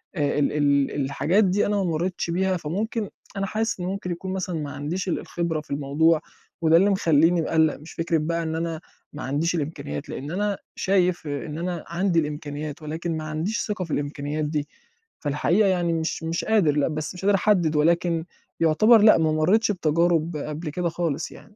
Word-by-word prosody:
آآ، 145 -3 0
ال 145 - +2
ال 140 -2 +2
الحاجات 170 +9 +2
دي 195 +2 +2
أنا 205 - 0
ما 200 - +1
مرّيتش 175 +1 -1
بيها 185 +2 +1
فممكن، 205 +7 -3 0.3
أنا 195 - 0
حاسس 220 +1 -2
إن 175 - -3
ممكن 185 -1 -3
يكون 185 +2 -4
مثلًا 185 -2 -3
ما 145 -2 -4
عنديش 150 +7 -4
ال 175 - 0
الخبرة 170 -3 -2
في 150 - -17
الموضوع 150 +3 +2 0.4
وده 165 0 +5
اللي 195 +4 +4
مخلّيني 170 -3 +3
مقلّق، 160 -1 +2
مش 155 +3 -12
فكرة 165 0 0
بقى 165 +2 -1
إن 160 0 -2
أنا 165 0 -3 0.3
ما 145 - -6
عنديش 150 +6 0
الإمكانيات 140 - -4
لإن 145 +4 -5
أنا 205 +1 -1 0.2
شايف 180 -4 +1
إن 145 +1 -4
أنا 175 0 -3
عندي 170 +1 +1
الإمكانيات 150 0 -4
ولكن 160 +2 -3
ما 155 - -4
عنديش 155 +8 -2
ثِقة 205 -4 -2
في 165 - -10
الإمكانيّات 145 +1 -2
دي 150 -1 -2 0.5
فالحقيقة 170 +8 +2
يعني 175 -2 +1
مش 160 0 -2
مش 165 +1 -2
قادر 210 -8 +3
لأ، 145 - +2
بس 155 +1 -4
مش 180 - -8
قادر 200 0 +5
أحدّد 180 -5 +2
ولكن 165 +2 +2 0.3
يُعتبَر 215 +8 +5
لأ، 215 +1 +7
ما 160 -1 +2
مرّيتش 190 +9 +3
بتجارُب 165 -2 +1
قبل 150 +2 -5
كده 175 +3 -1
خالص 165 -1 -2
يعني. 210 - -15
165 Hz, 190 wpm, -24 LUFS, 150-185 Hz, 0.5 s, لأ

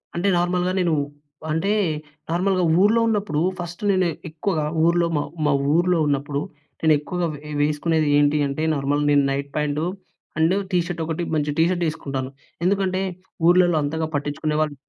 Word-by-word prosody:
అంటే, 180 +4 0
నార్మల్‍గా 180 +1 +1
నేను, 170 -3 +2 0.6
అంటే 165 +6 0 0.6
నార్మల్‍గా 185 +1 +1 0.2
ఊర్లో 220 +3 +4
ఉన్నప్పుడు 205 -9 0 0.2
ఫస్ట్ 175 +2 -6
నేను 185 -2 +2 0.2
ఎక్కువగా 155 0 -2 0.2
ఊర్లో, 170 0 +3
మా 145 - 0 0.2
మా 145 - +3 0.2
ఊర్లో 175 0 +3
ఉన్నప్పుడు 140 0 -1 0.4
నేను 160 -1 +5
ఎక్కువగా 175 +3 -2
వే 150 +1 -10
వేసుకునేది 150 +1 +1
ఏంటి 145 +1 +3
అంటే 140 +3 -3
నార్మల్ 140 +1 0
నేను 145 -1 +4
నైట్ 140 +1 -3
ప్యాంట్ 150 0 0 0.6
అండ్ 160 +3 +3 0.2
టీషర్ట్ 175 -1 -1
ఒకటి 165 +2 -3
మంచి 150 -1 0
టీషర్ట్ 175 +2 +2
వేసుకుంటాను. 135 -4 -4 0.4
ఎందుకంటే, 190 -1 +1 0.5
ఊర్లలలో 175 -2 +5
అంతగా 160 +2 -1
పట్టించుకునేవాళ్ళు 150 +1 -1
160 Hz, 140 wpm, -22 LUFS, 150-180 Hz, 0.6 s, నేను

